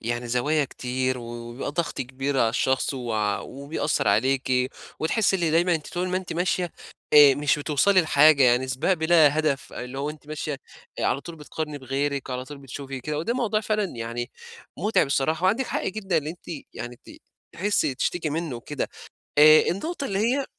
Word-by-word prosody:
يعني 120 Hz, +1 st, -3 dB
زوايا 145 Hz, +6 st, +1 dB
كتير 130 Hz, 0 st, -2 dB
و -, -, -8 dB
وبيبقى 120 Hz, +2 st, -6 dB
ضغط 170 Hz, +2 st, -2 dB
كبير 135 Hz, +2 st, -2 dB
على 115 Hz, -, +4 dB
الشخص 130 Hz, +3 st, 0 dB
وع 110 Hz, -5 st, -1 dB
وبيأثّر 140 Hz, 0 st, -2 dB
عليكِ 130 Hz, +3 st, +1 dB, 0.3 s
وتحسّي 195 Hz, +4 st, +2 dB
اللي 170 Hz, -3 st, 0 dB
دايمًا 170 Hz, +2 st, +3 dB
أنتِ 155 Hz, -, -4 dB
طول 180 Hz, +1 st, -1 dB
ما 180 Hz, -, 0 dB
أنتِ 185 Hz, -1 st, -4 dB
ماشية 175 Hz, 0 st, -1 dB, 0.4 s
آآ 145 Hz, -2 st, +9 dB
مش 145 Hz, +2 st, +1 dB
بتوصلي 155 Hz, +7 st, +3 dB
لحاجة، 155 Hz, -3 st, +5 dB
يعني 125 Hz, +1 st, +4 dB
سِباق 130 Hz, +8 st, +1 dB
بِلا 160 Hz, -3 st, +4 dB
هدف 150 Hz, -3 st, -1 dB
اللي 125 Hz, +2 st, -6 dB
هو 145 Hz, +2 st, -2 dB
أنتِ 150 Hz, -1 st, -12 dB
ماشية 150 Hz, -2 st, -4 dB, 0.4 s
آآ -, -, -1 dB
على 135 Hz, -, +1 dB
طول 170 Hz, +2 st, -9 dB
بتقارني 150 Hz, 0 st, -5 dB
بغيرِك 140 Hz, +1 st, -2 dB
وعلى 125 Hz, 0 st, -3 dB
طول 145 Hz, +1 st, -10 dB
بتشوفي 135 Hz, 0 st, -7 dB
كده 150 Hz, +3 st, -3 dB
وده 230 Hz, +10 st, -1 dB
موضوع 225 Hz, -4 st, 0 dB
فعلًا 215 Hz, -1 st, 0 dB
يعني 115 Hz, +2 st, -4 dB, 0.5 s
مُتعِب 210 Hz, -8 st, +2 dB
الصراحة 155 Hz, +5 st, 0 dB
وعندِك 225 Hz, +8 st, +2 dB
حق -, -, -2 dB
جدًا 195 Hz, -3 st, -1 dB
إن 150 Hz, -, -5 dB
أنتِ 170 Hz, +3 st, -8 dB, 0.3 s
يعني 120 Hz, 0 st, -6 dB
ت -, -, -11 dB, 0.4 s
تحسّي 170 Hz, -6 st, +1 dB
تشتكي 155 Hz, +4 st, -1 dB
منّه 160 Hz, -5 st, -3 dB
وكده. 140 Hz, +4 st, -4 dB, 0.5 s
آآ 155 Hz, +1 st, +9 dB
النقطة 280 Hz, -, -4 dB
اللي 195 Hz, -4 st, -1 dB
هي 255 Hz, +6 st, +1 dB
145 Hz, 180 wpm, -25 LUFS, 130-170 Hz, 0.5 s, آآ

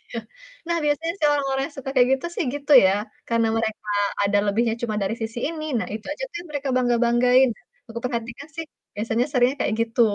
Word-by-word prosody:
Iya. 235 Hz, -, -3 dB, 0.5 s
Nah 340 Hz, -, +1 dB
biasanya 310 Hz, +3 st, 0 dB
sih 305 Hz, -, +3 dB
orang-orang 270 Hz, -2 st, 0 dB
yang 315 Hz, -, -13 dB
suka 270 Hz, 0 st, -5 dB
kayak 250 Hz, -1 st, +5 dB
gitu 270 Hz, -, -4 dB
sih 360 Hz, -, 0 dB
gitu 290 Hz, 0 st, -1 dB
ya, 190 Hz, -, +5 dB, 0.4 s
karena 230 Hz, -1 st, +2 dB
mereka 220 Hz, -1 st, -3 dB, 0.4 s
ada 200 Hz, 0 st, +3 dB
lebihnya 225 Hz, +3 st, +1 dB
cuma 220 Hz, -3 st, -1 dB
dari 195 Hz, +3 st, 0 dB
sisi 225 Hz, +1 st, -4 dB
ini, 315 Hz, -1 st, -5 dB
nah -, -, -3 dB
itu 220 Hz, -, -7 dB
aja -, -, -4 dB
kan 340 Hz, -, -4 dB
mereka 285 Hz, -2 st, -3 dB
bangga-banggain. 245 Hz, +1 st, +4 dB, 0.4 s
Aku 230 Hz, +1 st, -5 dB
perhatikan 240 Hz, +3 st, -4 dB
sih, 330 Hz, -, -3 dB, 0.3 s
biasanya 225 Hz, +3 st, 0 dB
seringnya 255 Hz, +1 st, +2 dB
kayak 215 Hz, -, +1 dB
gitu. 230 Hz, +1 st, -1 dB
245 Hz, 195 wpm, -23 LUFS, 225-285 Hz, 0.5 s, kayak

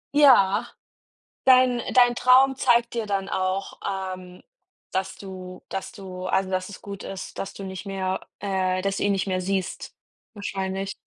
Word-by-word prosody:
Ja. 250 Hz, -10 st, +6 dB, 0.8 s
Dein 255 Hz, -2 st, +6 dB
äh, -, -, -4 dB
dein 245 Hz, -1 st, +6 dB
Traum 260 Hz, +2 st, +5 dB
zeigt 240 Hz, -2 st, +3 dB
dir 230 Hz, -, -1 dB
dann 195 Hz, -1 st, -2 dB
auch, 190 Hz, +1 st, -2 dB, 0.4 s
ähm, 180 Hz, 0 st, -13 dB, 0.5 s
dass 190 Hz, 0 st, -2 dB
du 185 Hz, -2 st, -9 dB
dass 195 Hz, -, -4 dB
du 185 Hz, -3 st, -8 dB
also, 190 Hz, 0 st, +1 dB
dass 185 Hz, 0 st, -2 dB
es 205 Hz, -, -10 dB
gut 200 Hz, -1 st, -8 dB
ist, 195 Hz, -1 st, -7 dB
dass 195 Hz, -, -4 dB
du 195 Hz, -, -8 dB
nicht 190 Hz, +1 st, -6 dB
mehr 190 Hz, -1 st, -2 dB, 0.2 s
äh, 185 Hz, -2 st, 0 dB
dass 195 Hz, 0 st, -1 dB
du -, -, -1 dB
ihn 205 Hz, -, +3 dB
nicht 195 Hz, -1 st, 0 dB
mehr 185 Hz, -1 st, 0 dB
siehst, 190 Hz, 0 st, -3 dB, 0.4 s
wahrscheinlich. 195 Hz, -1 st, -3 dB
195 Hz, 170 wpm, -25 LUFS, 185-210 Hz, 0.8 s, Ja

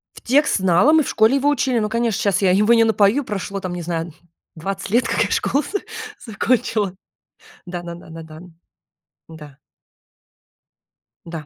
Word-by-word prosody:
В -, -, -12 dB
текст 280 Hz, +1 st, +2 dB
знала, 190 Hz, -, +3 dB
мы 315 Hz, -2 st, +5 dB
в -, -, -5 dB
школе 220 Hz, +4 st, +3 dB
его 280 Hz, +1 st, +2 dB
учили, 260 Hz, -4 st, +1 dB
но, 210 Hz, 0 st, -1 dB
конечно, 230 Hz, -2 st, 0 dB
сейчас 200 Hz, -1 st, +1 dB
я 185 Hz, -2 st, +3 dB
его 210 Hz, +5 st, +4 dB
не 230 Hz, -1 st, +5 dB
напою 220 Hz, +5 st, +3 dB
прошло 200 Hz, -2 st, -4 dB
там 185 Hz, -2 st, -5 dB
не 175 Hz, -, -5 dB
знаю 165 Hz, -1 st, -4 dB, 0.4 s
20 195 Hz, +4 st, -5 dB
лет, 230 Hz, +2 st, +2 dB
как 230 Hz, -, +1 dB
я -, -, -3 dB
школу 280 Hz, +3 st, +1 dB
за 405 Hz, -, -4 dB, 0.5 s
закончила. 210 Hz, -4 st, 0 dB, 0.7 s
Да 175 Hz, -1 st, -6 dB
да 170 Hz, -1 st, -7 dB
да 170 Hz, -, -14 dB
да 165 Hz, 0 st, -9 dB
да. 155 Hz, 0 st, -12 dB, 0.9 s
Да. 150 Hz, -3 st, -13 dB, 1.7 s
Да. 165 Hz, -3 st, -7 dB
200 Hz, 175 wpm, -20 LUFS, 175-235 Hz, 1.7 s, мы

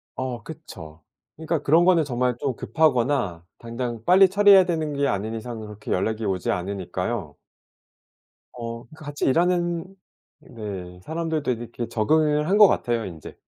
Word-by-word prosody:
어 130 Hz, -2 st, -4 dB
그쵸. 85 Hz, -, -11 dB, 0.3 s
그러니까 160 Hz, +1 st, -2 dB
그런 165 Hz, +4 st, +4 dB
거는 175 Hz, -3 st, +4 dB
정말 125 Hz, -3 st, -1 dB
좀 135 Hz, -3 st, -2 dB
급하거나 125 Hz, -, 0 dB
당장 115 Hz, -1 st, -5 dB
빨리 190 Hz, +2 st, +7 dB
처리해야 200 Hz, -1 st, +6 dB
되는 160 Hz, -4 st, -2 dB
게 140 Hz, 0 st, 0 dB
아닌 110 Hz, -2 st, -2 dB
이상 115 Hz, 0 st, -6 dB
그렇게 105 Hz, -1 st, -8 dB
연락이 110 Hz, +4 st, -1 dB
오지 95 Hz, -3 st, -1 dB
않으니까요. 95 Hz, -1 st, -4 dB, 1.2 s
어 115 Hz, -1 st, -7 dB
같이 145 Hz, -2 st, -5 dB
일하는 175 Hz, +3 st, +1 dB, 0.6 s
네 95 Hz, -6 st, -8 dB
사람들도 160 Hz, -, -2 dB
이렇게 120 Hz, 0 st, -5 dB
적응을 150 Hz, +6 st, +1 dB
한 200 Hz, -, +3 dB
것 210 Hz, -, +10 dB
같아요 120 Hz, -, 0 dB
인제. 80 Hz, -5 st, -10 dB
125 Hz, 310 characters per minute, -24 LUFS, 110-160 Hz, 1.2 s, 것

